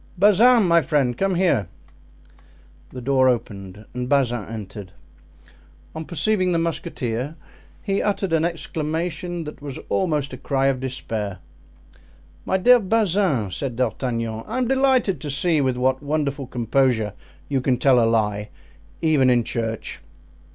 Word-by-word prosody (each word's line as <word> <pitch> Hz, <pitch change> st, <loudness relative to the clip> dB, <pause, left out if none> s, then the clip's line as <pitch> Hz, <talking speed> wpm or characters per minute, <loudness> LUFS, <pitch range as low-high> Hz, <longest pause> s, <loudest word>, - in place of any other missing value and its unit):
Bazin, 215 Hz, +5 st, +6 dB
my 170 Hz, 0 st, +5 dB
friend, 135 Hz, -4 st, +1 dB
come 195 Hz, +7 st, 0 dB
here." 170 Hz, -, +2 dB, 1.2 s
The 130 Hz, -, -8 dB
door 130 Hz, 0 st, +3 dB
opened 105 Hz, -4 st, -4 dB
and 125 Hz, 0 st, -4 dB
Bazin 120 Hz, -6 st, +1 dB
entered; 105 Hz, -4 st, -8 dB, 1.0 s
on 160 Hz, 0 st, -6 dB
perceiving 185 Hz, +4 st, +1 dB
the -, -, +2 dB
musketeer 145 Hz, -5 st, -3 dB, 0.5 s
he 195 Hz, -2 st, 0 dB
uttered 195 Hz, -4 st, -1 dB
an 160 Hz, -1 st, +3 dB
exclamation 165 Hz, +1 st, -3 dB
that 150 Hz, -1 st, -9 dB
was 140 Hz, -2 st, -6 dB
almost 150 Hz, -7 st, 0 dB
a -, -, -6 dB
cry 135 Hz, +1 st, -1 dB
of 130 Hz, -2 st, -1 dB
despair. 110 Hz, -6 st, -4 dB, 1.1 s
"My 190 Hz, -, +1 dB
dear 245 Hz, +6 st, +6 dB
Bazin," 190 Hz, -, +1 dB
said 130 Hz, +3 st, -4 dB
D'Artagnan, 115 Hz, -3 st, -2 dB
"I 225 Hz, -, -3 dB
am 255 Hz, -2 st, +1 dB
delighted 260 Hz, -, +2 dB
to 150 Hz, -, -5 dB
see 150 Hz, +3 st, +1 dB
with 130 Hz, -2 st, 0 dB
what 130 Hz, +1 st, +1 dB
wonderful 145 Hz, -2 st, -2 dB
composure 120 Hz, -3 st, +1 dB, 0.3 s
you 135 Hz, -2 st, 0 dB
can 130 Hz, -1 st, +1 dB
tell 125 Hz, -2 st, +4 dB
a -, -, +3 dB
lie 105 Hz, -2 st, 0 dB, 0.5 s
even 150 Hz, -5 st, +4 dB
in 120 Hz, -1 st, +3 dB
church!" 115 Hz, -1 st, -4 dB
140 Hz, 140 wpm, -22 LUFS, 120-170 Hz, 1.2 s, Bazin